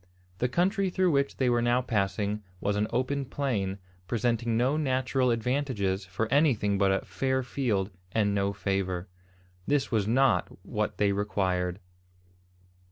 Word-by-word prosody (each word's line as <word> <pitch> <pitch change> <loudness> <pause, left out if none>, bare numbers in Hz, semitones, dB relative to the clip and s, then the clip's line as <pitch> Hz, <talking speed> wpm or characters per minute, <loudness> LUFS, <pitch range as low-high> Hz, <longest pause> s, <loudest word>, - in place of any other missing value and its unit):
The 125 - +1
country 190 - +1
through 185 0 +2
which 140 -1 +1
they 130 - +1
were 120 -1 +3
now 120 +1 +3
passing 105 -2 -1 0.2
was 100 +2 0
an 105 +1 +1
open 135 +3 0
plain, 120 -8 -2 0.3
presenting 115 0 0
no 130 +5 +2
natural 130 -3 +1
advantages 115 -5 0
for 95 +5 -2
anything 115 -9 +3
but 100 -1 +4
a 95 - 0
"fair 130 -1 -1
field 110 -7 -1 0.2
and 105 -1 +1
no 100 0 +1
favour." 95 -2 -2 0.6
This 145 -2 +1
was 105 -4 +1
not 130 +2 +3 0.2
what - - -2
they 100 -1 +3
required. 95 -3 -1
115 Hz, 145 wpm, -28 LUFS, 100-130 Hz, 0.6 s, but